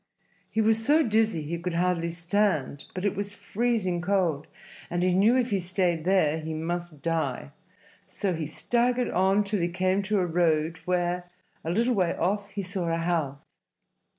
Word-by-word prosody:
He 220 - 0
was 220 +1 +3
so 300 +6 +4
dizzy 220 - +1
he 170 +3 -4
could 175 0 -3
hardly 170 -1 +1
stand, 170 -5 0
but 185 +2 -3
it 200 - +1
was 200 +1 -4
freezing 200 -3 -1
cold, 180 -6 0 0.4
and 175 0 -1
he 185 0 +3
knew 210 +7 +4
if 250 -2 0
he 200 - +2
stayed 180 -2 0
there 170 -5 +3
he 160 0 -5
must 170 -1 -4
die. 155 -5 -1 0.6
So 195 -3 -2
he 160 -2 -3
staggered 245 +9 0
on 190 +3 +3
till 205 0 0
he 170 - +1
came 185 +2 +1
to 205 +2 0
a 185 - +2
road 165 -2 +1
where, 180 0 -1 0.3
a 160 - -3
little 230 +8 +2
way 185 -6 +1
off, 200 +3 -1
he 200 -1 -4
saw 180 -2 -2
a 165 - +1
house. 165 -5 -2
180 Hz, 180 wpm, -27 LUFS, 165-205 Hz, 0.6 s, so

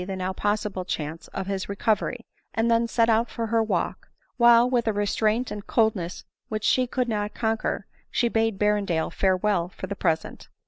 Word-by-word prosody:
the 190 +1 -4
now 185 0 -2
possible 205 -1 -1
chance 160 -2 -4
of 195 - -5
his 195 0 -3
recovery, 220 +4 -1 0.3
and 225 +1 +2
then 230 0 +3
set 230 0 +2
out 230 +1 +2
for 230 - -3
her 225 0 +2
walk; 220 - -2 0.3
while, 235 0 +6
with 245 -2 0
a - - +4
restraint 215 +4 0
and 205 -1 -6
coldness 215 -7 0 0.3
which 215 -1 -3
she 255 -1 +3
could 250 0 -1
not 210 -2 -2
conquer, 225 -1 -1 0.2
she 240 - +1
bade 225 -2 +1
Berrendale 205 -6 +1
farewell 190 -2 +1
for - - -7
the 200 - -5
present. 160 -4 -2
215 Hz, 180 wpm, -25 LUFS, 195-230 Hz, 0.3 s, while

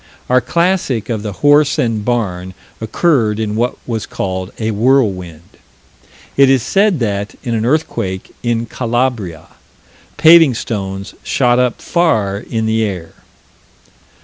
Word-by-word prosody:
Our 125 0 +4
classic 170 - 0
of 110 -3 -2
the 105 -1 -4
horse 145 0 +4
and 115 -3 0
barn 95 -6 -2 0.3
occurred 110 -3 +1
in 105 -1 -2
what 120 +3 -1
was 115 -3 -4
called 95 0 -4
a 110 0 -2
whirlwind. 100 - +1 0.9
It 135 -1 +5
is 135 -3 +3
said 200 +2 +2
that, 100 -2 -2
in 120 -3 -2
an 115 0 0
earthquake 100 -10 -2
in 120 -1 -1
Calabria, 115 -9 -2 0.7
paving 160 -3 +7
stones 95 -3 -5
shot 125 -2 +1
up 125 -2 0
far 110 - +1
in 110 +1 -3
the 110 0 +1
air. 90 -6 -4
115 Hz, 130 wpm, -16 LUFS, 100-130 Hz, 0.9 s, paving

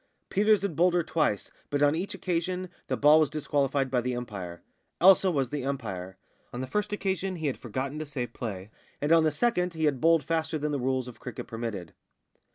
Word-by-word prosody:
Peters 210 0 +3
had 195 -6 -2
bowled 175 +3 +3
her 175 - +3
twice, 150 -11 0 0.2
but 145 0 +1
on 145 0 +5
each 175 +5 -3
occasion 180 +1 -2 0.2
the - - -1
ball 150 +2 +7
was 155 -3 +3
disqualified 140 -3 0
by 125 -2 +2
the 125 +1 -2
umpire. 95 -8 -6 0.4
Elsa 190 +1 +7
was 135 -7 0
the 145 -3 -2
umpire. 95 -9 -4 0.3
On 120 - -6
the 130 - -2
first 210 +9 -2
occasion 195 -2 -1
he 160 -2 -5
had 140 - 0
forgotten 130 +5 -4
to 155 - -4
say 135 -4 -3
play, 105 -5 -6 0.3
and 145 +2 -1
on 165 -1 +6
the 155 - +3
second 180 - 0
he 160 -1 0
had 140 -4 +1
bowled 165 -2 +4
faster 160 +1 -1
than 150 0 -2
the 145 - -1
rules 130 0 0
of 120 -3 -10
cricket 125 -1 -7
permitted. 115 -7 -5
145 Hz, 210 wpm, -28 LUFS, 125-170 Hz, 0.4 s, ball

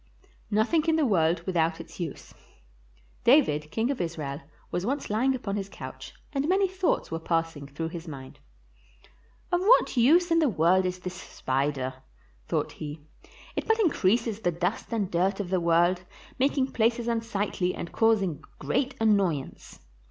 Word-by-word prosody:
NOTHING 240 +10 +2
IN 325 -1 +3
THE 315 -2 +2
WORLD 170 -6 +2
WITHOUT 165 -3 +1
ITS - - -11
USE 165 -5 -6 0.9
David, 195 - +4
King 230 - 0
of 275 - -3
Israel, 155 -4 -4 0.3
was 175 - -1
once 270 +2 -2
lying 255 +5 +2
upon 210 -5 -3
his 195 -1 -4
couch - - -9 0.2
and 280 +2 0
many 385 +1 +3
thoughts 375 - -1
were 165 - -2
passing 165 -3 -2
through 160 +4 -4
his 170 0 -8
mind. 135 -4 -9 0.6
" - - -30
Of 350 - +3
what 440 - +5
use 330 +9 +4
in 330 - +5
the 310 -4 +3
world 185 +1 +3
is 180 0 -3
this 180 0 -5
spider? 130 -5 -2 0.2
" - - -33
thought - - 0
he; 150 0 -7 0.5
"it - - -3
but 445 -1 +3
increases 230 - +2
the 175 -6 0
dust 180 +8 -2
and 210 -5 -1
dirt 190 +4 +1
of 190 -3 -4
the 185 -2 +2
world, 170 +2 +3 0.4
making 270 0 +1
places 230 +1 +1
unsightly 210 -5 -1
and 170 - -6
causing 205 -8 +2
great 250 - -1
annoyance." 195 - 0
190 Hz, 165 wpm, -27 LUFS, 165-245 Hz, 0.9 s, what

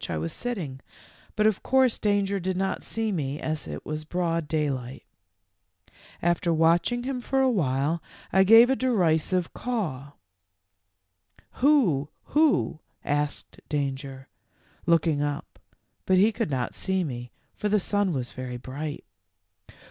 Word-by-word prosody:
151 80 - -2
I - - -2
was 80 - -3
sitting, 180 - -4 0.6
but, 215 - +2
of 215 -3 +2
course, 260 -2 +3
Danger 200 -1 +1
did 185 0 -2
not 190 0 -1
see 225 -1 -2
me, 145 -5 -2
as 155 -1 -3
it - - -7
was 155 0 -4
broad 165 -1 -1
daylight. 140 -5 -2 0.8
w - - -30 0.3
After 175 0 +2
watching 170 +9 +2
him 255 -1 -3
for 270 +2 0
a 265 -1 +4
while 150 - 0 0.3
I 190 - +6
gave 225 +5 +8
a - - +3
derisive 180 -8 +1
caw. 155 - -3 1.5
'Who, 225 - +3
who,' 300 - +2 0.3
asked 145 0 -2
Danger, 135 -2 -3 0.6
looking 165 -3 +3
up, 145 -1 -4 0.5
but 185 - +4
he 205 +4 +5
could 205 - -2
not 130 -3 -2
see 190 -1 -1
me, 125 -5 -5 0.2
for 210 - -2
the 210 0 +3
sun 205 0 0
was 125 -6 -3
very 125 -1 -6
bright. 140 +4 -6
170 Hz, 140 wpm, -26 LUFS, 145-210 Hz, 1.5 s, gave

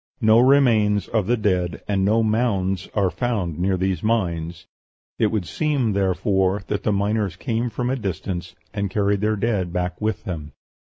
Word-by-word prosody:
No 110 +1 +6
remains 120 -6 +4
of 110 -4 0
the 120 +1 +2
dead 90 -7 -1
and 100 -2 +1
no 110 +3 +3
mounds 100 -5 0
are 100 -4 +2
found 100 - -2
near 95 +1 +1
these 95 0 -1
mines: 85 -7 -1 0.5
it 110 - +4
would 105 -3 -1
seem, 140 - 0
therefore, 95 0 +1
that 105 - -1
the 105 - 0
miners 100 -2 0
came 115 +3 -2
from 125 +3 -2
a - - +1
distance, 90 - -4 0.2
and 100 -1 -2
carried 100 0 +1
their 110 0 +1
dead 100 -5 -1
back 90 +1 -3
with 110 0 -1
them. 75 -7 -6
100 Hz, 170 wpm, -22 LUFS, 90-110 Hz, 0.5 s, No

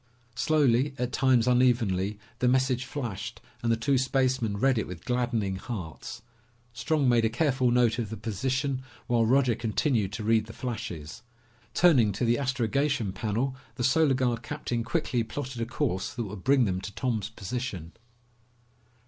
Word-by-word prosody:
Slowly, 135 -1 +2
at 125 -1 -2
times 130 -3 +3
unevenly, 115 -6 +2 0.2
the 125 - +2
message 130 0 +2
flashed 115 -5 -5 0.2
and 115 -2 +1
the 115 - +2
two 130 +4 +2
spacemen 130 -4 +1
read 130 +2 +3
it - - -3
with 90 -3 -9
gladdening 120 -6 0
hearts. 95 -6 -7 0.5
Strong 150 +2 0
made 120 -2 +4
a 110 - +3
careful 130 0 +1
note 120 -1 +3
of 115 -4 -2
the 110 - -5
position 130 +5 -1 0.2
while 115 -2 +2
Roger 130 0 +4
continued 115 -2 0
to 110 - -4
read 110 0 +2
the 110 - -9
flashes. 110 -10 -6 0.5
Turning 135 -12 +5
to 120 - -1
the 120 +3 +2
astrogation 135 -2 0
panel, 120 +6 -1 0.2
the 125 - -3
Solar 135 +2 +4
Guard 125 -3 0
captain 120 -3 -3
quickly 125 -1 0
plotted 125 0 -5
a 115 - -1
course 120 -7 -2
that 120 - -2
would 100 -3 -8
bring 135 -2 +4
them 95 -2 -1
to 105 - -6
Tom's 110 -6 -1
position. 110 -5 -5
120 Hz, 160 wpm, -28 LUFS, 110-130 Hz, 0.5 s, Turning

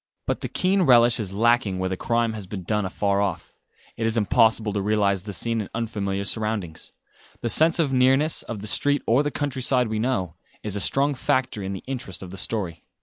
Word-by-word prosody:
But - - -2
the - - -3
keen 190 +1 +1
relish 120 -7 +5
is 100 -4 -4
lacking 115 -1 +2
where 95 0 -1
the 95 - -2
crime 115 +3 0
has 105 -4 -7
been 95 -1 -6
done 105 +2 -1
afar 100 +1 0
off. 95 -4 -3 0.4
It 115 - 0
is 115 +1 0
impossible 110 +1 +3
to 100 - -1
realise 100 -2 +1
the 105 +2 -7
scene 115 +5 -1
in 100 - -7
unfamiliar 100 -4 -2
surroundings. 105 -6 -3 0.5
The 120 - -1
sense 160 +7 +4
of 150 -6 +1
nearness, 135 +4 +3
of 110 -4 -7
the 105 - -6
street 145 +7 +2
or 120 +5 +3
the 145 - -1
countryside 130 -4 0
we 110 0 -2
know, 110 -9 -1 0.3
is 105 -2 -3
a - - -1
strong 140 +6 +2
factor 130 -4 -1
in 95 0 -4
the 95 - -7
interest 120 -9 -5
of 90 - -9
the 95 - -8
story. 90 -8 -3
110 Hz, 210 wpm, -24 LUFS, 100-125 Hz, 0.5 s, relish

